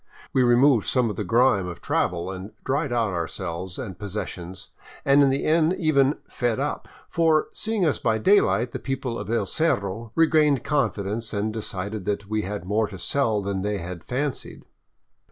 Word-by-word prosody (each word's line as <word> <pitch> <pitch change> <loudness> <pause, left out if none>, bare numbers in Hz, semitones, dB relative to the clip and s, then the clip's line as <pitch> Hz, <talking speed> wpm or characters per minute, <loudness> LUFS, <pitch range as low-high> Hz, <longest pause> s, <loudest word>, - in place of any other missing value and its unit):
We 130 - +3
removed 120 -1 +4
some 125 -4 +2
of - - -6
the 105 - -3
grime 100 -1 +3
of 85 - -7
travel 85 +1 -1
and 95 +2 -8
dried 140 +1 -1
out 115 -5 +1
ourselves 85 +1 -4
and 105 -8 -6
possessions, 95 -3 -6 0.4
and 140 +1 +6
in 140 - +5
the 135 +1 0
end 160 +2 +3
even 145 -5 +3
" - - -39
fed 120 -3 -1
up." - - -3 0.2
For, 160 -2 +2
seeing 220 -4 -1
us 150 - +1
by 110 -1 +1
daylight, 125 - +3
the - - -5
people 135 -3 -3
of 105 0 -6
El 115 -3 +1
Cerro 115 - -1
regained 155 -4 +4
confidence 115 -6 -1
and 105 +1 -1
decided 100 -2 -5
that 105 0 -1
they 110 +1 0
had 105 -2 -5
more 105 +3 +1
to 100 - -9
sell 110 0 0
than 100 -1 -2
they 105 +1 -1
had 85 -2 -7
fancied. 135 +2 -4
110 Hz, 180 wpm, -24 LUFS, 100-140 Hz, 0.4 s, and